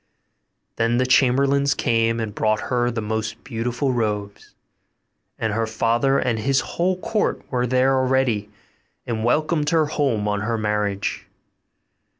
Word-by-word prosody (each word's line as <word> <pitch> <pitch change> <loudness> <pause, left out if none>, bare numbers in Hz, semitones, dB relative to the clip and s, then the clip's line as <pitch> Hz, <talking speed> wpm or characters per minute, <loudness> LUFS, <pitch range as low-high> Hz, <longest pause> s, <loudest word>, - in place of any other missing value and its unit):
Then 115 +1 +1
the 130 - +2
chamberlains 135 +2 +3
came 115 -1 +1
and 110 -2 -3
brought 110 +1 +1
her 120 -1 +2
the 115 -2 -3
most 110 0 -3
beautiful 125 +2 -2
robes; 105 -3 -3 0.8
and 110 -2 -1
her 115 +1 0
father 120 +5 +1
and 115 -4 0
his 135 +4 +2
whole 180 +2 -1
court 215 +3 -1
were 125 -1 0
there 130 +2 +3
already, 130 -5 +1 0.6
and 110 -2 -3
welcomed 150 +4 +1
her 160 -1 +3
home 135 -8 0
on 105 0 -1
her 115 +2 -1
marriage. 105 -2 -2
120 Hz, 140 wpm, -22 LUFS, 110-135 Hz, 0.8 s, chamberlains